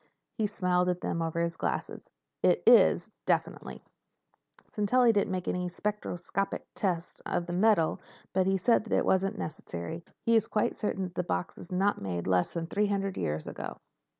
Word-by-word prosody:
He 215 -3 0
smiled 180 -3 +1
at 180 0 -1
them 165 - -2
over 165 0 -1
his 170 -1 -2
glasses. - - -3 0.3
"It - - +3
is—definitely. - - +3 0.9
Sintelli 235 +3 +3
didn't 200 -2 +2
make 185 -1 -3
any 180 0 -1
spectroscopic 195 -1 -3
tests 180 -4 -2
of 170 - -2
the 175 - -5
metal, 190 -3 +3 0.3
but 190 0 +2
he 195 0 +3
said 230 +2 +3
that - - +1
wasn't 195 +3 +2
necessary. 155 - -5 0.2
He 230 - +4
is 225 0 +3
quite 215 +2 0
certain 200 -3 -2
that 180 -1 -5
the 180 - -1
box 90 - -2
was 175 - -10
made 180 - -1
not 205 +1 +2 0.2
less 90 - +1
than 165 -1 -2
three 205 +5 0
hundred 195 -1 -1
years 75 0 -2
ago." - - -6
185 Hz, 170 wpm, -29 LUFS, 170-205 Hz, 0.9 s, He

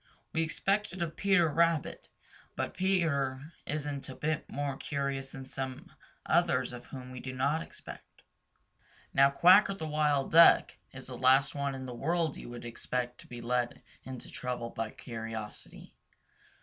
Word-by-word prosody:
We 160 - +1
expect 195 +5 0
it 185 - -6
of 160 -2 -4
Peter 195 -4 +4
Rabbit, 165 0 +1 0.5
but - - -2
Peter 155 -6 0
isn't 145 -2 -3
a 130 - -7
bit 155 0 -2
more 140 -1 -2
curious 135 -1 -3
than 135 0 -8
some 130 -1 -6 0.3
others - - +2
of 120 - -9
whom 130 -1 -8
we 130 - -7
do 130 +1 -6
not 140 +5 +1
expect - - -9
it. - - -24 0.9
Now 135 0 +6
Quacker 185 +7 +6
the 160 - -5
Wild 150 -2 +1
Duck 165 +1 +7 0.2
is - - -9
the - - -6
last 130 +2 +4
one 140 -1 -2
in 130 0 -6
the 125 - -6
world 160 +4 0
you - - -9
would 120 0 -8
expect 125 +1 -3
to - - -13
be 120 -1 -8
led 120 0 -1 0.2
into 130 -2 -8
trouble 125 -2 -4
by 115 -1 -3
curiosity. 115 -3 -7
140 Hz, 160 wpm, -31 LUFS, 125-160 Hz, 0.9 s, Duck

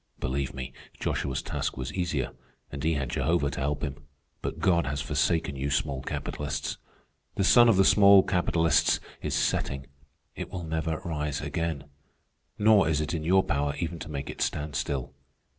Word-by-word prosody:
Believe 65 0 -2
me, 65 -1 -6 0.3
Joshua's 65 -2 -2
task - - -3
was 65 -1 -4
easier, 85 -8 -1 0.4
and 70 0 -6
he 80 0 +2
had 70 -3 -2
Jehovah 80 -4 +1
to - - -5
help 70 +2 -1
him. 70 -2 -3 0.4
But - - -4
God 85 -4 +2
has 70 0 -2
forsaken 80 +1 0
you 70 +1 -2
small 70 -1 -1
capitalists. 70 +2 -4 0.6
The - - +1
sun 120 +5 +7
of 105 - +4
the 95 - +5
small 100 -2 +7
capitalists 85 -3 +2 0.2
is - - -2
setting. 70 -1 0 0.5
It - - -5
will 90 -2 -5
never 80 0 -2
rise 75 -3 -2
again. 80 -1 -2 0.7
Nor 105 -5 +5
is 75 -2 +1
it 75 +2 -2
in 80 -2 -2
your 95 +3 +4
power 70 -1 0
even 85 -1 -3
to 75 - -7
make 70 -2 -4
it - - -9
stand 75 -1 -2
still. 70 -3 -2
75 Hz, 175 wpm, -28 LUFS, 70-85 Hz, 0.7 s, sun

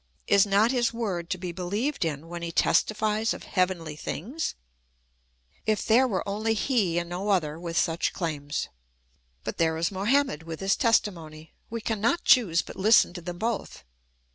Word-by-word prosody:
Is 200 0 +4
not 205 +4 +4
his 245 -2 +1
word 195 -8 -3
to 185 - -1
be 180 -1 -5
beheved 205 - -2
in 160 -1 -3
when 170 0 -6
he 170 0 -4
testifies 215 +4 +1
of - - -10
heavenly 180 -5 -1
things? 240 - -4 1.1
If 215 -2 +1
there 245 +4 +5
were 200 -4 -2
only 215 +3 0
he, 210 -7 +1
and 175 0 -1
no 180 +4 -4
other, 160 -5 +1
with 170 -1 -4
such 165 +1 +1
claims! 150 -4 -3 0.7
But - - -5
there 160 -1 +2
is 170 +3 0
Mohammed 205 - +1
with 165 -1 -7
his 195 0 +2
testimony; 165 -9 0 0.2
we 230 0 -4
cannot 225 +8 0
choose 195 -10 +4
but - - -11
Hsten 210 -2 +5
to 175 - -7
them 175 0 -6
both. 225 +2 -3
190 Hz, 165 wpm, -27 LUFS, 170-220 Hz, 1.1 s, there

